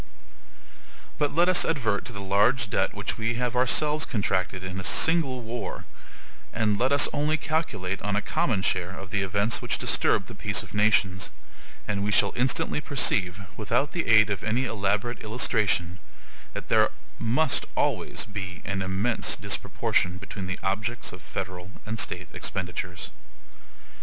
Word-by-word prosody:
But 145 -1 +2
let 175 +2 +5
us 185 -1 +5
advert 115 -10 0
to 120 - -5
the 100 -3 -6
large 100 +3 +2
debt - - +1
which - - -3
we 115 +1 0
have 125 0 -1
ourselves 150 +4 +2
contracted 95 -5 -1
in 95 0 -4
a - - -5
single 135 - +3
war, 115 -4 -5 0.7
and 110 -2 +1
let 130 +2 +2
us 140 - +6
only 150 +2 +1
calculate 145 - -2
on 105 0 -1
a 105 - +1
common 100 -3 0
share 95 0 -1
of 95 -2 -9
the 105 - +1
events 100 +4 +1
which - - -1
disturb - - +2
the - - -9
peace - - -1
of - - -13
nations, 100 -3 +2 0.6
and 100 -1 -1
we 105 - 0
shall 100 0 +3
instantly 130 +4 +1
perceive, 100 -10 +1
without 120 +6 0
the 170 - -2
aid 110 -2 +6
of 100 - -2
any 115 +5 +1
elaborate 105 +1 -1
illustration, 105 -5 0 0.6
that - - -5
there - - +5 0.3
must 130 +6 +1
always - - 0
be 95 -5 -6
an 95 0 -2
immense 95 +5 0
disproportion 90 +1 0
between 100 0 -7
the 95 - -3
objects 105 +5 -2
of 90 - -10
federal 90 -2 -6 0.2
and 110 0 -4
state - - -2
expenditures. 90 -1 -4
105 Hz, 155 wpm, -26 LUFS, 95-125 Hz, 0.7 s, us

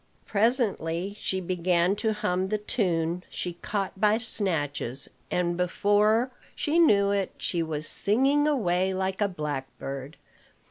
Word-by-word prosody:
Presently 200 -5 0
she 190 - -1
began 180 0 +1
to 220 +1 0
hum 185 -3 -1
the 215 - +1
tune 180 -5 -1
she 180 - -4
caught 195 -2 -3
by 210 0 +4
snatches; 150 - -1 0.2
and, 175 -1 0
before 205 +7 +2 0.2
she 310 +3 +1
knew 200 -11 +5
it, 200 -2 -1
she 170 - -1
was 155 -2 -3
singing 275 +8 +3
away 190 -9 +1
like 190 +1 -2
a 205 - +4
blackbird. 140 -3 -5
190 Hz, 130 wpm, -27 LUFS, 170-210 Hz, 0.2 s, knew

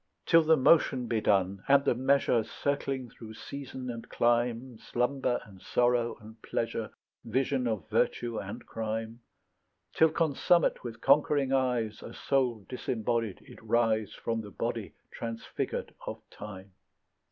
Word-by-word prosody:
Till 165 - +6
the 160 0 +4
motion 130 -2 +4
be 115 -2 0
done 95 -2 +1
and 140 0 +5
the - - +4
measure 130 -2 +2
Circling 135 -1 -2
through 110 -1 -11
season 130 -1 -6
and 115 -1 -8
clime, 120 0 +1
Slumber 125 0 0
and 95 -3 -15
sorrow 120 -1 +1
and 110 +1 -14
pleasure, 115 -1 -2 0.3
Vision 130 +2 0
of 105 -8 -2
virtue 120 -2 0
and 100 +1 -7
crime; 110 +1 -4 0.7
Till 160 - +5
consummate 165 +2 +2
with 115 -2 -7
conquering 140 -1 +3
eyes, 125 -5 0
A - - -9
soul 125 -7 0
disembodied, 115 -4 -2
it - - -14
rise 110 -2 +1
From 115 -1 -2
the 105 - -9
body - - -4 0.2
transfigured 115 -1 -4
of - - -7
time. 100 -2 -9
120 Hz, 135 wpm, -30 LUFS, 110-135 Hz, 0.7 s, Till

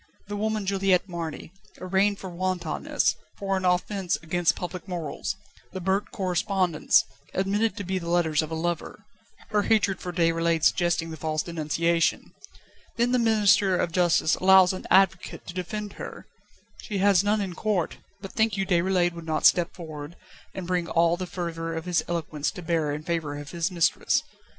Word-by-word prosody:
The 205 - -3
woman 215 0 -1
Juliette 195 -1 +2
Marny, 165 -3 -6 0.3
arraigned 195 +2 +1
for 190 -2 -8
wantonness, 175 -2 -1 0.2
for 195 -1 -1
an 190 -1 -2
offence 180 +1 +1
against 175 +1 +1
public 180 +1 -6
morals; 175 0 -4 0.4
the 190 - -4
burnt 190 +3 0
correspondence, 185 -2 +1 0.3
admitted 205 +4 0
to 200 - -4
be 190 0 -2
the 170 -1 -6
letters 165 -3 +2
of 155 - -5
a 160 - -3
lover 170 0 -3 0.4
her 210 -1 +2
hatred 205 -3 +2
for 180 - -5
Déroulède 165 -1 +1
suggesting 175 -2 +2
the 160 - -7
false 155 0 -1
denunciation. 170 +1 0 0.6
Then 240 +1 +2
the 250 - +3
Minister 205 -4 +4
of 170 - 0
Justice 175 -2 +3
allows 190 -1 +6
an 185 - -7
advocate 190 -1 +2
to 175 - -7
defend 205 +3 -4
her. - - -8 0.6
She 210 - -4
has 195 -1 +4
none 210 +1 +2
in 195 -3 -3
court; 195 -2 -1 0.2
but 195 - -8
think 220 -3 +1
you 195 - 0
Déroulède 180 -1 +2
would 170 -1 -8
not 155 -1 0
step 175 -1 +4
forward, 155 -2 -8 0.4
and 190 - -5
bring 175 -1 -1
all 170 0 +3
the 185 0 -5
fervour 165 -2 -4
of 160 +1 -5
his 180 -2 +1
eloquence 155 -3 -2
to 180 -4 -8
bear 160 -3 0
in 150 +1 -4
favour 155 -3 -2
of 145 0 -8
his 170 +1 -1
mistress? 175 -3 +1
180 Hz, 175 wpm, -26 LUFS, 165-195 Hz, 0.6 s, allows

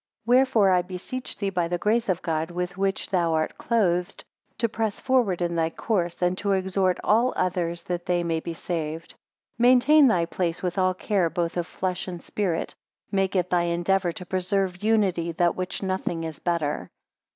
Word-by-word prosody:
3 240 +2 +4
Wherefore 250 -7 +4
I 180 -1 +4
beseech 185 +8 -6
thee 200 -1 -2
by 175 -3 0
the 175 +1 -1
grace 225 +4 +1
of 185 -1 0
God 160 -1 -1
with 180 +1 -4
which 195 +1 -1
thou 170 -3 +2
art 155 0 -2
clothed, 180 -7 0 0.3
to 230 - +1
press 220 -2 -2
forward 235 -10 +1
in 170 0 -1
thy 165 -1 +1
course, 175 -2 -2
and 180 +1 +2
to 200 -1 +1
exhort 190 -1 +1
all 235 +4 +3
others 170 -2 -1
that 175 -1 -4
they 175 -1 +1
may 165 -1 0
be 165 +1 -6
saved. 165 -1 -4
4 - - -20 0.4
Maintain 255 +5 +6
thy 175 -8 +2
place 175 0 -2
with 180 +1 -1
all 185 0 +2
care 185 -3 +1
both 170 +1 -2
of 175 -1 -2
flesh 185 0 -3
and 175 -2 -6
spirit: 185 -6 -2 0.4
Make 195 -1 0
it 180 -1 0
thy 175 -1 +3
endeavour 175 +2 +1
to 180 - -8
preserve 185 0 -1
unity, 190 -6 +1
than 175 +1 +2
which 185 +2 -4
nothing 185 -3 -2
is 160 -2 -6
better. 165 -4 -1
180 Hz, 190 wpm, -25 LUFS, 170-200 Hz, 0.4 s, Maintain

